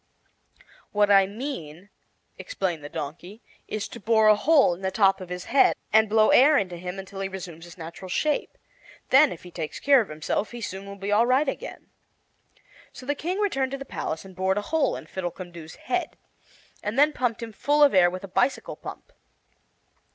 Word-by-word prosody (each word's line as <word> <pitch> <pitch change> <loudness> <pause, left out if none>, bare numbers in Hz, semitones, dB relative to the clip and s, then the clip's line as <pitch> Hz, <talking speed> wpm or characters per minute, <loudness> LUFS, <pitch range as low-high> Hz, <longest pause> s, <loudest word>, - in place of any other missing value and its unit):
"What 205 0 +3
I 195 -1 +6
mean," 200 - -7 0.5
explained 175 -6 -3
the 145 - -7
Donkey, 175 +11 -7 0.2
"is 215 0 -4
to - - -9
bore 220 0 +4
a 215 - +7
hole 275 - +4
in 175 - -10
the 190 - -1
top 195 -1 +2
of 185 - -8
his 180 0 -5
head, 275 - +4 0.2
and 220 0 +5
blow 215 0 +4
air 290 +4 +6
into 180 -6 -2
him 180 +2 -6
until 195 0 -8
he 195 - -2
resumes 175 -3 -8
his 175 - -13
natural 170 +2 -9
shape. 300 +10 -1 0.5
Then, 275 +2 +6
if 170 - -9
he 180 - -11
takes 160 -3 -5
care 280 -2 +5
of 215 - -6
himself, 155 +7 -2
he 240 - -6
soon 195 -1 -6
will 200 - -8
be 200 +1 -4
all 220 +3 +4
right 265 +4 +3
again." 455 - -6 1.0
So 255 - -12
the 290 - 0
King 345 +6 -3
returned 275 -11 0
to - - -2
the 275 - -8
palace 160 -8 -5
and 190 -1 -13
bored 190 +1 0
a - - +1
hole 305 +2 0
in - - -8
Fiddlecumdoo's 175 -3 -7
head, - - -3 0.6
and 210 +4 -4
then 295 +2 +5
pumped 240 -3 -1
him 225 -1 -7
full 295 +7 +2
of 285 - +5
air 180 -2 +6
with 185 +1 -7
a - - -6
bicycle 250 +8 -1
pump. - - -10
200 Hz, 200 wpm, -25 LUFS, 180-260 Hz, 1.0 s, a